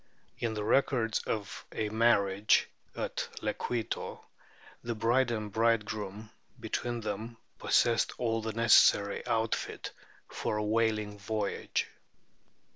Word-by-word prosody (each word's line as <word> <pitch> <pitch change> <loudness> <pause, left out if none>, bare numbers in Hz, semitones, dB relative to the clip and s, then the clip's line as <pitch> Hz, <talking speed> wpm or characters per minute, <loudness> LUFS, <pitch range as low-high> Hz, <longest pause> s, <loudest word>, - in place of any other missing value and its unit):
In 115 -2 -1
the 105 - -2
records 115 -1 +2
of 105 -3 -3
a 110 -1 -2
marriage 105 -3 +3 0.3
at - - -3
Le - - 0
queito 120 -3 -3 0.6
the 120 0 -3
bride 120 +3 +2
and 110 -3 -3
bridegroom 110 -1 -1 0.3
between 120 -1 -3
them 110 +2 -5 0.2
pos - - +4
sessed 115 -1 +1
all 115 -2 0
the 110 0 -4
necessary 105 -3 +5
outfit 115 0 -1 0.4
for 105 - -3
a 105 - -1
whaling 105 -2 0
voyage. 105 0 -2
110 Hz, 120 wpm, -31 LUFS, 105-115 Hz, 0.6 s, necessary